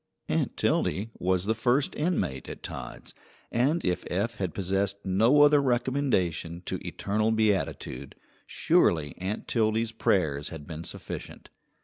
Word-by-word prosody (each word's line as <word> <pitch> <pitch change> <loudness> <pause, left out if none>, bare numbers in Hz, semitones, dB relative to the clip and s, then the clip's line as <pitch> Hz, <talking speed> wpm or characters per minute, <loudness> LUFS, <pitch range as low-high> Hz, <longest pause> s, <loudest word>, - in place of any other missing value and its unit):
Aunt - - 0
Tildy 105 +4 0
was 90 0 +1
the 110 - +2
first 125 +5 +1
inmate 150 - -1
at - - -8
Todd's, - - -7 0.4
and 140 +8 +1
if 90 -1 0
Eph 100 +6 -1
had 95 -4 -2
possessed 95 +1 0
no 115 +10 +5
other 145 0 +6
recommendation 120 - 0
to - - -3
eternal 110 +2 -1
beatitude, 105 - -1 0.3
surely 75 -4 +2
Aunt 95 +4 -4
Tildy's 110 0 +1
prayers 90 -11 +1
had 80 -3 -8
been 80 0 -7
sufficient. - - -8
105 Hz, 130 wpm, -28 LUFS, 90-120 Hz, 0.4 s, other